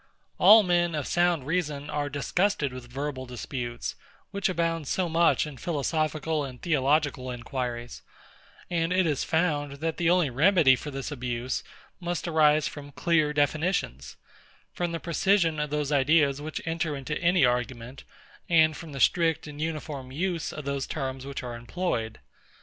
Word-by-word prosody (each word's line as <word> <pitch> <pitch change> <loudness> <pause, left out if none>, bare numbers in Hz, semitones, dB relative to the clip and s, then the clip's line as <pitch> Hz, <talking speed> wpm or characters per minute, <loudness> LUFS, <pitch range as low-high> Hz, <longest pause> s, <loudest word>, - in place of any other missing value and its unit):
All 220 0 +9
men 175 -2 +1
of 150 -3 -2
sound 175 -5 +1
reason 150 -3 -2
are 145 -1 -2
disgusted 150 0 0
with 125 -1 -10
verbal 135 -1 -4
disputes, 120 -1 -5 0.4
which 200 -1 0
abound 165 -4 -1
so 185 +4 0
much 165 0 +3
in 150 -3 -8
philosophical 155 +1 -1
and 130 -3 -7
theological 145 -4 +1
inquiries; 120 -1 -5 0.7
and 165 -1 -1
it 185 0 +3
is 150 -4 0
found, 150 -4 0
that 160 +3 -3
the 170 -1 +2
only 175 -6 +3
remedy 155 0 +5
for 145 - -7
this 135 +1 -5
abuse 125 -2 -3 0.4
must 175 -1 -3
arise 155 -2 +4
from 145 -1 -8
clear 155 -1 +2
definitions, 145 - -1 0.6
from 175 -1 -2
the 165 - -3
precision 170 -2 +2
of 150 0 -1
those 150 -1 -1
ideas 145 0 +3
which 155 +1 -5
enter 165 -2 -1
into 140 +2 -4
any 175 -4 +4
argument, 125 +1 -2 0.5
and 160 -2 +5
from 155 -1 -9
the 135 - -5
strict 165 +2 +2
and 150 -1 -8
uniform 150 -4 -4
use 170 +3 -2
of 150 - -7
those 140 -1 -2
terms 135 -2 -4
which 140 -1 -5
are 120 -1 -5
employed. 115 -3 -3
150 Hz, 155 wpm, -27 LUFS, 135-165 Hz, 0.7 s, All